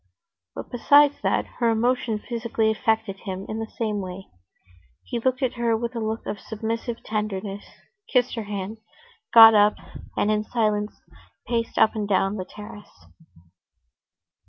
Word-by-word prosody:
But, - - -8
besides 285 +4 +4
that, - - +1
her 235 -2 +3
emotion 230 0 +1
physically 225 -1 -1
affected 220 -2 -1
him 190 -1 -6
in 220 - -4
the 225 0 -5
same 215 -3 -1
way. 185 +1 -8 0.7
He 240 - -4
looked 255 +3 0
at 255 - +1
her 235 -2 0
with 235 +1 -4
a - - -2
look 220 0 -3
of 205 - -4
submissive 230 +2 -4
tenderness, 205 -2 -3 0.5
kissed 250 -1 +2
her 225 -3 -4
hand, 205 +1 -5 0.5
got 225 -1 +10
up, 210 0 +5 0.4
and, 210 - +2
in 210 0 +1
silence, 215 -2 -1 0.5
paced 230 -1 -2
up 220 - +5
and 210 -2 -3
down 195 +1 +1
the 185 - -4
terrace. 205 +1 -12
220 Hz, 150 wpm, -24 LUFS, 210-235 Hz, 0.7 s, got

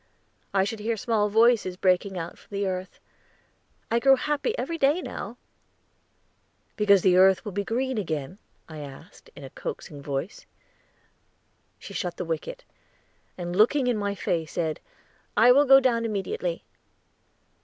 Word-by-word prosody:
"I 195 -1 +2
should 215 +3 -4
hear 225 +2 -2
small 210 -1 0
voices 220 -4 +3
breaking 185 +1 +1
out 170 0 -5
from 200 - -9
the 200 - 0
earth. 185 -1 -4 0.9
I 235 - +3
grow 270 +2 +6
happy 295 - -1
every 330 -1 -3
day 285 +5 +3
now." 240 - -7 1.4
"Because 200 -3 +4
the 180 -1 +4
earth 190 +3 +5
will 210 - -4
be 200 +2 -2
green 255 +3 -1
again?" 160 0 -4 0.3
I 155 -2 -9
asked, 145 +3 -12
in 145 - -11
a 135 - -9
coaxing 145 -2 -7
voice. 140 +6 -5 1.3
She - - -11
shut - - -3
the - - -4
wicket, - - -5 0.7
and, 175 -1 -4
looking 245 +7 +4
in 245 -1 +1
my 205 -1 -2
face, 165 -4 -2
said, 160 -3 -2 0.6
"I 240 +2 +7
will 285 +3 +5
go 270 0 +8
down 240 -3 +1
immediately." 230 - -3
205 Hz, 150 wpm, -26 LUFS, 180-250 Hz, 1.4 s, go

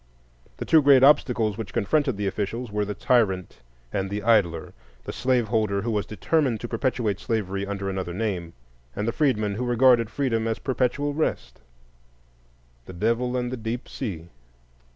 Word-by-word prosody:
The - - -5
two 160 - +5
great 140 -2 +6
obstacles 120 -7 +3
which 110 - -6
confronted 130 +2 +1
the 105 - -2
officials 105 +4 -3
were 105 0 -1
the 105 0 -4
tyrant 95 -6 +1 0.3
and 95 -1 -1
the 100 +1 -4
idler,—the 80 - -1
slaveholder 110 -5 0
who 115 - -1
was 105 -5 -1
determined 130 +1 0
to 120 - -4
perpetuate 115 -4 -1
slavery 100 -4 -2
under 100 -1 -4
another 95 -2 -3
name; 95 -6 -3 0.4
and, 105 - -2
the - - +2
freedman 110 -9 +1
who 115 +5 -3
regarded 120 -2 +4
freedom 115 -4 -1
as 115 - -1
perpetual 135 +2 -1
rest,—the 140 - -3 1.3
Devil 115 +6 0
and 125 0 -2
the 130 - -3
Deep 115 +2 -4
Sea. 85 - -6
110 Hz, 150 wpm, -25 LUFS, 100-125 Hz, 1.3 s, great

